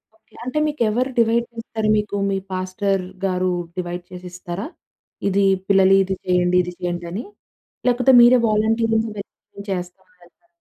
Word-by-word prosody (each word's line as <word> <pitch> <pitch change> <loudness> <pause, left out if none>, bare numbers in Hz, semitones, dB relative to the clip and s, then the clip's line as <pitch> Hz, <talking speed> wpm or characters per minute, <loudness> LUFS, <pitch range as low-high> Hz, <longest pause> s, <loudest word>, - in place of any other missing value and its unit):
Okay. 220 - -34
అంటే 255 +4 -4
మీకెవరు 250 -3 0
divide 235 +1 +3
చేస్తారు 225 -1 -4
మీకు? 210 -1 -2
మీ 195 - 0
పాస్టర్‌గారు 185 0 -1 0.3
డివైడ్ 175 0 -4
చేసిస్తారా? 180 +3 -7 0.6
ఇది 195 +1 +2 0.2
పిల్లలు 195 -1 +5
ఇది 190 0 -3
చేయండి 180 0 +2
,ఇది 180 0 -6
చేయండని. 175 +4 -4 0.6
లేకపోతే 250 +1 +4
మీరే 245 +1 +7
వాలంటీర్‌గా 225 +1 +2 0.2
వెళ్ళి 200 0 -11
చేస్తామని 180 0 -7
వెళ్తారా? 175 - -25
195 Hz, 125 wpm, -21 LUFS, 180-225 Hz, 0.6 s, మీరే